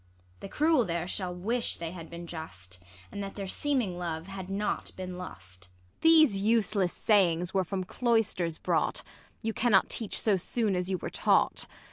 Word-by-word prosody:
The 195 Hz, -, -8 dB
cruel 305 Hz, -1 st, +3 dB
there 170 Hz, -3 st, -2 dB
shall 185 Hz, -1 st, -2 dB
Avish 230 Hz, +7 st, -1 dB
they 165 Hz, -1 st, -5 dB
had 170 Hz, -2 st, -9 dB
been 170 Hz, 0 st, -8 dB
just, 95 Hz, -, -8 dB, 0.3 s
And 200 Hz, -, -5 dB
that 195 Hz, -, -7 dB
their 200 Hz, -, -4 dB
seeming 220 Hz, -4 st, 0 dB
love 165 Hz, -2 st, -4 dB
had 190 Hz, -1 st, -7 dB
not 200 Hz, +2 st, -2 dB
been 185 Hz, -1 st, -6 dB
lust. 95 Hz, -, -10 dB
Ang. 90 Hz, 0 st, -33 dB
These 315 Hz, -9 st, +6 dB
useless 205 Hz, -3 st, +2 dB
sayings 180 Hz, -4 st, +2 dB
were 190 Hz, -1 st, +2 dB
from 185 Hz, +1 st, -3 dB
cloisters 200 Hz, -6 st, 0 dB
brought: -, -, 0 dB, 0.4 s
You 225 Hz, 0 st, -1 dB
cannot 220 Hz, -5 st, +3 dB
teach 220 Hz, -4 st, -1 dB
so 210 Hz, -3 st, +3 dB
soon 210 Hz, +2 st, -1 dB
as 180 Hz, +1 st, -1 dB
you 190 Hz, -, 0 dB
were -, -, -6 dB
taught. -, -, +2 dB
190 Hz, 175 wpm, -29 LUFS, 170-215 Hz, 0.4 s, These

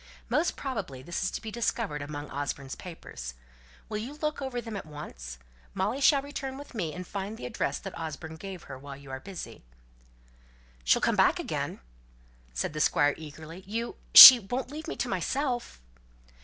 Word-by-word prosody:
Most 325 Hz, +3 st, +1 dB
probably 200 Hz, -, -5 dB
this 175 Hz, +3 st, -4 dB
is 190 Hz, -, 0 dB
to -, -, -6 dB
be 220 Hz, -, -6 dB
discovered 225 Hz, -8 st, -2 dB
among 145 Hz, 0 st, -7 dB
Osborne's 140 Hz, -1 st, -4 dB
papers. 65 Hz, -, -9 dB, 0.5 s
Will 215 Hz, -, -4 dB
you 245 Hz, +6 st, -6 dB
look 300 Hz, -1 st, -3 dB
over 265 Hz, -2 st, -3 dB
them 225 Hz, -2 st, -7 dB
at 195 Hz, -, -6 dB
once? 60 Hz, -, -9 dB, 0.4 s
Molly 275 Hz, -, -1 dB
shall 280 Hz, -1 st, +5 dB
return 270 Hz, -2 st, -6 dB
with 285 Hz, -1 st, -11 dB
me, 175 Hz, -9 st, -3 dB
and 180 Hz, +3 st, -7 dB
find 200 Hz, +3 st, -5 dB
the -, -, -8 dB
address 235 Hz, -, -2 dB
that 195 Hz, -, -8 dB
Osborne 160 Hz, 0 st, -7 dB
gave 190 Hz, 0 st, -8 dB
her, 130 Hz, -1 st, -9 dB
while 140 Hz, 0 st, -9 dB
you 140 Hz, -1 st, -12 dB
are 135 Hz, -, -5 dB
busy 165 Hz, -, -9 dB, 0.6 s
" -, -, -30 dB
"She'll -, -, +3 dB
come -, -, +2 dB
back -, -, +3 dB
again?" -, -, -4 dB, 0.7 s
said 60 Hz, -, -3 dB
the 150 Hz, -, -2 dB
Squire 145 Hz, -1 st, +3 dB
eagerly. 160 Hz, +3 st, -10 dB
"You 230 Hz, +3 st, -4 dB, 0.2 s
she 255 Hz, -2 st, +14 dB
won't 245 Hz, +5 st, -4 dB
leave 310 Hz, +2 st, -7 dB
me -, -, -4 dB
to -, -, -2 dB
myself?" 255 Hz, -, -2 dB
180 Hz, 185 wpm, -28 LUFS, 140-240 Hz, 0.7 s, she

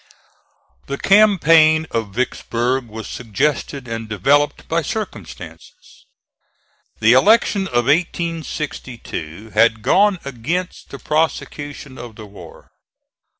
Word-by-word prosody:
The 140 Hz, -, -3 dB
campaign 165 Hz, -6 st, +5 dB
of 110 Hz, -4 st, -3 dB
Vicksburg 125 Hz, 0 st, -1 dB
was 110 Hz, 0 st, -8 dB
suggested 135 Hz, +3 st, -2 dB
and 115 Hz, -1 st, -5 dB
developed 140 Hz, +9 st, +1 dB
by 165 Hz, +1 st, 0 dB
circumstances. 95 Hz, -, -8 dB, 0.9 s
The 110 Hz, +2 st, +5 dB
elections 200 Hz, -, +4 dB
of 120 Hz, -5 st, 0 dB
1862 140 Hz, -, -3 dB
had 110 Hz, -2 st, +3 dB
gone 205 Hz, 0 st, +3 dB
against 145 Hz, +8 st, -4 dB
the 140 Hz, -, -8 dB
prosecution 145 Hz, -3 st, -3 dB
of 120 Hz, -3 st, -9 dB
the 110 Hz, -, -10 dB
war. 100 Hz, 0 st, -14 dB
140 Hz, 100 wpm, -19 LUFS, 115-165 Hz, 0.9 s, campaign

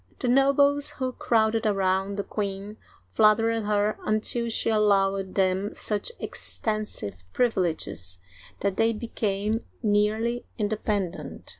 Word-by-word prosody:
The -, -, -2 dB
nobles 280 Hz, +2 st, +3 dB
who 255 Hz, -1 st, -2 dB
crowded 220 Hz, -2 st, +2 dB
around 195 Hz, 0 st, +1 dB
the 200 Hz, -, -1 dB
queen 200 Hz, +1 st, -4 dB, 0.3 s
flattered 225 Hz, +1 st, +3 dB
her 210 Hz, 0 st, +1 dB
until 225 Hz, +2 st, +1 dB
she 225 Hz, 0 st, +1 dB
allowed 195 Hz, -3 st, +2 dB
them 190 Hz, +1 st, +1 dB
such 210 Hz, -, -2 dB
extensive 215 Hz, -, -3 dB, 0.2 s
privileges 160 Hz, -, -1 dB, 0.4 s
that 200 Hz, -1 st, 0 dB
they 225 Hz, 0 st, +3 dB
became 215 Hz, -1 st, -2 dB, 0.2 s
nearly 215 Hz, +3 st, +1 dB
independent. 205 Hz, -4 st, -2 dB
210 Hz, 110 wpm, -26 LUFS, 195-225 Hz, 0.4 s, nobles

